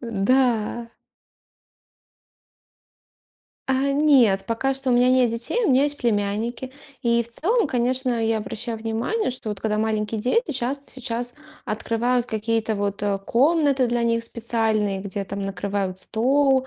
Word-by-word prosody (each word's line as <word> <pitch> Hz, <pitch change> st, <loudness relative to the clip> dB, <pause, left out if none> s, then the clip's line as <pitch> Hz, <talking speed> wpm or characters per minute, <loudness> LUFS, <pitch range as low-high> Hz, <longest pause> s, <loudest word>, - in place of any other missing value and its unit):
Да. 230 Hz, +1 st, +1 dB, 2.8 s
А, 270 Hz, +1 st, +1 dB
нет, 260 Hz, -10 st, +4 dB
пока 265 Hz, +4 st, 0 dB
что 270 Hz, -1 st, -2 dB
у -, -, +4 dB
меня 245 Hz, +1 st, +4 dB
нет 255 Hz, -2 st, +4 dB
детей, 240 Hz, -, -1 dB
у -, -, +3 dB
меня 265 Hz, +2 st, +4 dB
есть 290 Hz, 0 st, -2 dB
племянники. 230 Hz, +3 st, -1 dB, 0.3 s
И 235 Hz, 0 st, +3 dB
в 235 Hz, -, -12 dB
целом, 415 Hz, -, +1 dB
конечно, 250 Hz, -1 st, 0 dB
я 225 Hz, 0 st, +1 dB
обращаю 225 Hz, +2 st, -4 dB
внимание, 230 Hz, -, -1 dB
что 250 Hz, -2 st, -6 dB
вот, 205 Hz, -2 st, -4 dB
когда 215 Hz, -1 st, -1 dB
маленькие 215 Hz, 0 st, -1 dB
дети, 460 Hz, -, +1 dB
часто 270 Hz, +1 st, -3 dB
сейчас 245 Hz, -1 st, -5 dB, 0.3 s
открывают 235 Hz, +3 st, 0 dB
какие-то 220 Hz, 0 st, -1 dB
вот, 200 Hz, 0 st, -2 dB
э, 200 Hz, -1 st, 0 dB
комнаты 280 Hz, 0 st, +3 dB
для 240 Hz, 0 st, 0 dB
них 230 Hz, 0 st, +1 dB
специальные, 220 Hz, -4 st, -1 dB
где 200 Hz, 0 st, -4 dB
там 200 Hz, +1 st, -5 dB
накрывают 195 Hz, -1 st, -3 dB
стол. 265 Hz, +5 st, +2 dB
235 Hz, 140 wpm, -23 LUFS, 215-260 Hz, 2.8 s, нет